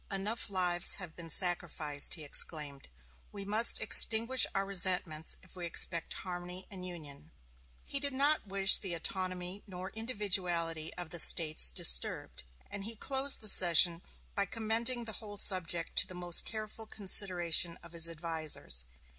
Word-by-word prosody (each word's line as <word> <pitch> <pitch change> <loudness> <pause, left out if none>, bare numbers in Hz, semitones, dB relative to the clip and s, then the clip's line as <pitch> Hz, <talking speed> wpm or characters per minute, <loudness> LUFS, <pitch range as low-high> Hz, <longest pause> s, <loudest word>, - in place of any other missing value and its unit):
"Enough 205 +4 -5
lives 180 -2 0
have 180 -4 -9
been 170 -1 -12
sacrificed," 160 -4 -1
he 160 - -10
exclaimed; 145 -1 0 0.4
"we 200 -1 -10
must 215 +3 +3
extinguish 230 +3 +6
our 195 0 -2
resentments 180 -5 0
if 185 - -14
we 175 -2 -8
expect 170 0 0
harmony 180 0 -9
and 190 -2 -11
union." 155 -4 -12 0.6
He 280 - -2
did 285 0 -6
not 280 -2 -1
wish 195 0 +5
the 180 -3 -7
autonomy 185 +2 -5
nor 185 -1 -10
the 220 - -9
individuality 180 -8 -2
of 175 -2 -10
the 175 - -5
States 155 - +3
disturbed; - - 0 0.3
and 205 - -8
he 225 +1 -7
closed 270 +4 -2
the 215 - -7
session 175 -2 +3 0.3
by 200 -1 -3
commending 230 +3 -3
the 220 - -4
whole 205 -1 -10
subject 175 -4 0
to - - +4
the 185 - -10
most 175 -1 -2
careful 220 0 -8
consideration 180 -5 +4
of 170 - -14
his 170 -1 0
advisers. 160 - -6
180 Hz, 155 wpm, -30 LUFS, 165-205 Hz, 0.6 s, extinguish